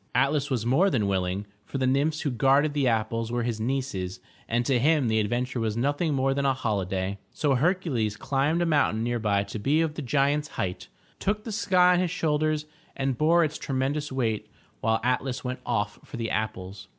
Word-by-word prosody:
Atlas 140 Hz, +3 st, +2 dB
was 120 Hz, -5 st, -1 dB
more 155 Hz, +11 st, +4 dB
than 115 Hz, -, +1 dB
willing, 95 Hz, 0 st, -1 dB, 0.2 s
for 135 Hz, -, -5 dB
the 130 Hz, -, +1 dB
nymphs 145 Hz, +4 st, +1 dB
who 145 Hz, -, -1 dB
guarded 135 Hz, +5 st, +3 dB
the 140 Hz, -3 st, +1 dB
apples 115 Hz, 0 st, 0 dB
were 120 Hz, 0 st, 0 dB
his 115 Hz, -2 st, -2 dB
nieces 110 Hz, -7 st, -2 dB, 0.3 s
and 120 Hz, +1 st, +1 dB
to 130 Hz, -1 st, +2 dB
him 150 Hz, 0 st, +3 dB
the 110 Hz, 0 st, +2 dB
adventure 120 Hz, +4 st, -1 dB
was 110 Hz, -1 st, -1 dB
nothing 145 Hz, +5 st, 0 dB
more 135 Hz, 0 st, +2 dB
than 140 Hz, 0 st, -1 dB
a 135 Hz, -1 st, +2 dB
holiday. 100 Hz, -5 st, -2 dB
So 145 Hz, -2 st, +1 dB
Hercules 135 Hz, -, 0 dB
climbed 145 Hz, +5 st, +1 dB
a -, -, +1 dB
moimtain 145 Hz, -9 st, +2 dB
nearby 110 Hz, -4 st, +1 dB
to 100 Hz, +2 st, -6 dB
be 140 Hz, +9 st, +2 dB
of 160 Hz, -2 st, 0 dB
the 155 Hz, -, -5 dB
giant's 145 Hz, +3 st, +1 dB
height, 90 Hz, -1 st, -3 dB, 0.3 s
took 210 Hz, +1 st, -1 dB
the 225 Hz, -, -5 dB
sky 180 Hz, -4 st, +4 dB
on 175 Hz, -, +2 dB
his 180 Hz, -1 st, +1 dB
shoulders, 155 Hz, -2 st, 0 dB, 0.3 s
and 135 Hz, -1 st, 0 dB
bore 165 Hz, +6 st, +4 dB
its 155 Hz, 0 st, -2 dB
tremendous 140 Hz, +2 st, -2 dB
weight 110 Hz, -5 st, -1 dB, 0.3 s
while 110 Hz, 0 st, +1 dB
Atlas 125 Hz, +1 st, -1 dB
went 125 Hz, 0 st, -3 dB
off 115 Hz, -2 st, -1 dB
for 130 Hz, -, -9 dB
the 115 Hz, -1 st, -3 dB
apples. 100 Hz, -3 st, -4 dB
130 Hz, 200 wpm, -26 LUFS, 110-150 Hz, 0.3 s, more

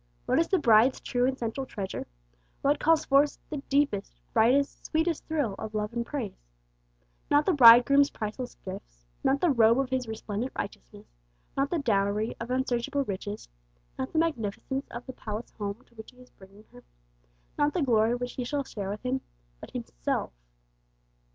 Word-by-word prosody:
What -, -, +2 dB
is 335 Hz, -, +2 dB
the 385 Hz, -, +2 dB
Bride's 235 Hz, -3 st, +5 dB
true 245 Hz, 0 st, 0 dB
and 265 Hz, 0 st, -1 dB
central 235 Hz, +3 st, -3 dB
treasure? 195 Hz, -5 st, -5 dB, 0.6 s
What 290 Hz, +1 st, +3 dB
calls 325 Hz, 0 st, +3 dB
forth 280 Hz, +1 st, +3 dB
the 300 Hz, -, -2 dB
deepest, 275 Hz, -8 st, 0 dB
brightest, 250 Hz, +5 st, +3 dB
sweetest 320 Hz, 0 st, -1 dB
thrill 295 Hz, -10 st, 0 dB
of 220 Hz, 0 st, -6 dB
love 210 Hz, +1 st, -2 dB
and 235 Hz, 0 st, -1 dB
praise? 235 Hz, -6 st, -5 dB, 0.9 s
Not 290 Hz, +1 st, +4 dB
the 375 Hz, -, +3 dB
Bridegroom's 275 Hz, +2 st, +8 dB
priceless 220 Hz, +4 st, -5 dB
gifts, -, -, -9 dB, 0.2 s
not 270 Hz, +1 st, +2 dB
the 350 Hz, -, +4 dB
robe 230 Hz, -2 st, +5 dB
of 270 Hz, -1 st, -1 dB
His 255 Hz, -2 st, -1 dB
resplendent 220 Hz, +2 st, -4 dB
righteousness, -, -, -7 dB, 0.5 s
not 275 Hz, +1 st, +1 dB
the 345 Hz, -, 0 dB
dowry 210 Hz, -5 st, 0 dB
of 230 Hz, -, -6 dB
unsearchable 255 Hz, +1 st, 0 dB
riches, 205 Hz, -1 st, -5 dB, 0.5 s
not 260 Hz, -, -4 dB
the -, -, -3 dB
magnificence 270 Hz, -3 st, -1 dB
of 235 Hz, -, -8 dB
the 260 Hz, -, -7 dB
palace 215 Hz, 0 st, -6 dB
home 205 Hz, +3 st, -5 dB
to -, -, -28 dB
which 220 Hz, -1 st, -11 dB
He 250 Hz, -, -20 dB
is 250 Hz, 0 st, -17 dB
bringing 195 Hz, +2 st, -17 dB
her, 125 Hz, -, -14 dB, 0.7 s
not 290 Hz, 0 st, +1 dB
the 350 Hz, -, +1 dB
glory 230 Hz, -2 st, +3 dB
which 245 Hz, 0 st, -4 dB
she 250 Hz, -, -4 dB
shall 285 Hz, +3 st, -2 dB
share 200 Hz, -7 st, -6 dB
with 205 Hz, +3 st, -5 dB
Him, 260 Hz, +1 st, 0 dB, 0.4 s
but -, -, -10 dB
Himself! -, -, -3 dB
245 Hz, 175 wpm, -28 LUFS, 215-280 Hz, 0.9 s, Bridegroom's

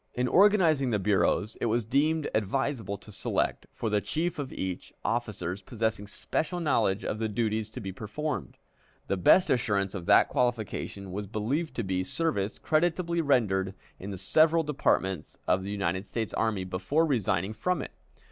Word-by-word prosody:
In 125 Hz, +1 st, +1 dB
organizing 175 Hz, -8 st, +4 dB
the 110 Hz, -, +2 dB
bureaus, 105 Hz, +2 st, +1 dB
it -, -, +1 dB
was 115 Hz, +1 st, +1 dB
deemed 150 Hz, +6 st, +1 dB
advisable 110 Hz, -1 st, -1 dB
to 105 Hz, -, -13 dB
select, 100 Hz, -, -1 dB
for 115 Hz, -, -4 dB
the 105 Hz, -1 st, +1 dB
chief 160 Hz, -, -2 dB
of 135 Hz, -2 st, -4 dB
each, 95 Hz, -1 st, -4 dB
officers 100 Hz, -6 st, -2 dB
possessing 110 Hz, 0 st, -2 dB
special 160 Hz, -, -2 dB
knowledge 115 Hz, -, +1 dB
of 110 Hz, -, -2 dB
the 110 Hz, -1 st, -1 dB
duties 110 Hz, 0 st, -1 dB
to -, -, -8 dB
be 95 Hz, -2 st, -5 dB
performed. 135 Hz, +10 st, -4 dB, 0.5 s
The -, -, 0 dB
best 100 Hz, -, +5 dB
assurance 105 Hz, -6 st, +1 dB
of 90 Hz, -4 st, -6 dB
that -, -, +6 dB
qualification 110 Hz, -5 st, -2 dB
was 100 Hz, +2 st, -4 dB
believed 130 Hz, -, -2 dB
to 115 Hz, -, -1 dB
be 95 Hz, -1 st, -1 dB
service 105 Hz, -, -1 dB
creditably 170 Hz, +1 st, +1 dB
rendered 100 Hz, -10 st, +1 dB, 0.2 s
in 95 Hz, -, -6 dB
the 95 Hz, -, -5 dB
several 160 Hz, -, +4 dB
departments 95 Hz, -, 0 dB
of 90 Hz, -, +3 dB
the 100 Hz, -, -5 dB
United 95 Hz, -1 st, -2 dB
States 115 Hz, -3 st, -3 dB
Army 110 Hz, -4 st, 0 dB
before 95 Hz, -, 0 dB
resigning 105 Hz, -, 0 dB
from 175 Hz, +11 st, -1 dB
it. -, -, -8 dB
110 Hz, 165 wpm, -28 LUFS, 100-145 Hz, 0.5 s, that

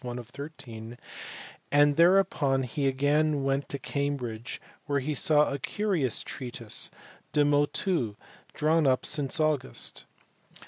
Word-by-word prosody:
1 120 Hz, -1 st, -5 dB
of 120 Hz, -1 st, -9 dB
13; 125 Hz, -5 st, -9 dB, 0.7 s
and 145 Hz, 0 st, +5 dB
thereupon 170 Hz, -6 st, +3 dB
he 140 Hz, +3 st, -1 dB
again 145 Hz, +2 st, +1 dB
went 135 Hz, +1 st, -1 dB
to 140 Hz, -, -3 dB
Cambridge 130 Hz, -5 st, -3 dB, 0.3 s
where 140 Hz, -1 st, +1 dB
he 145 Hz, +3 st, -2 dB
saw 150 Hz, 0 st, +3 dB
"a 140 Hz, -, -3 dB
curious 170 Hz, -, 0 dB
treatise, 120 Hz, -4 st, -2 dB, 0.4 s
De 145 Hz, -1 st, +4 dB
Motu, 145 Hz, -, +1 dB, 0.4 s
drawn 155 Hz, 0 st, +2 dB
up 130 Hz, -1 st, +2 dB
since 145 Hz, 0 st, +1 dB
August." 150 Hz, -, 0 dB
140 Hz, 125 wpm, -28 LUFS, 130-150 Hz, 0.7 s, and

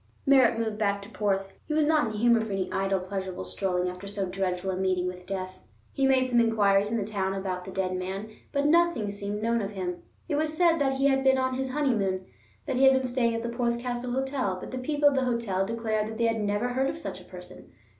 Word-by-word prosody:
Merritt 260 Hz, -5 st, +5 dB
moved 220 Hz, -2 st, -2 dB
back 200 Hz, -2 st, +1 dB
to 200 Hz, -, -11 dB
Porth—he 195 Hz, +6 st, -2 dB
was 310 Hz, -1 st, +3 dB
not 305 Hz, -4 st, +3 dB
in -, -, -3 dB
the 215 Hz, -, -5 dB
humor 235 Hz, +1 st, +4 dB
for 220 Hz, -2 st, -4 dB
any 190 Hz, -1 st, -2 dB
idle, 195 Hz, 0 st, 0 dB
pleasurable 190 Hz, 0 st, -5 dB
strolling 180 Hz, -2 st, -1 dB
after 180 Hz, +2 st, -6 dB
so 200 Hz, -1 st, -2 dB
dreadful 185 Hz, 0 st, -2 dB
a -, -, -2 dB
meeting 185 Hz, -1 st, 0 dB
with 180 Hz, 0 st, -6 dB
death. 185 Hz, -1 st, -5 dB, 0.3 s
He 270 Hz, -1 st, +2 dB
made 260 Hz, -1 st, +4 dB
some 245 Hz, -2 st, +2 dB
inquiries 205 Hz, -3 st, +3 dB
in 230 Hz, -, +1 dB
the 205 Hz, -, -1 dB
town 195 Hz, -2 st, -2 dB
about 185 Hz, -2 st, -3 dB
the 190 Hz, -, -7 dB
dead 185 Hz, -1 st, -1 dB
man, 190 Hz, +4 st, -4 dB, 0.2 s
but 280 Hz, 0 st, 0 dB
nothing 325 Hz, -9 st, +3 dB
seemed 205 Hz, +1 st, -4 dB
known 230 Hz, 0 st, +1 dB
of 200 Hz, +1 st, -4 dB
him. 180 Hz, -2 st, -4 dB, 0.3 s
It 295 Hz, -4 st, 0 dB
was 310 Hz, 0 st, -1 dB
said 335 Hz, -2 st, +4 dB
that 270 Hz, -2 st, +2 dB
he 270 Hz, +1 st, 0 dB
had 270 Hz, -1 st, +3 dB
been 265 Hz, 0 st, +4 dB
on 260 Hz, 0 st, 0 dB
his 265 Hz, +1 st, -2 dB
honeymoon, 215 Hz, -10 st, 0 dB, 0.4 s
that 270 Hz, -4 st, -1 dB
he 270 Hz, -, +5 dB
had 265 Hz, -, +7 dB
been 260 Hz, 0 st, +1 dB
staying 245 Hz, -2 st, +1 dB
at 230 Hz, -, -3 dB
the 235 Hz, -, -2 dB
Porth 235 Hz, 0 st, 0 dB
Castle 245 Hz, 0 st, -3 dB
Hotel; 265 Hz, -7 st, -1 dB
but -, -, -8 dB
the 255 Hz, -, -4 dB
people 290 Hz, +3 st, +2 dB
of 285 Hz, -, +4 dB
the 265 Hz, -1 st, +1 dB
hotel 220 Hz, -6 st, 0 dB
declared 220 Hz, -1 st, -1 dB
that 220 Hz, 0 st, -6 dB
they 230 Hz, -, +1 dB
had 225 Hz, -1 st, +1 dB
never 205 Hz, +4 st, 0 dB
heard 265 Hz, +2 st, 0 dB
of 310 Hz, -, -4 dB
such 325 Hz, -, -6 dB
a -, -, -16 dB
person. -, -, -12 dB
225 Hz, 250 wpm, -27 LUFS, 195-260 Hz, 0.4 s, had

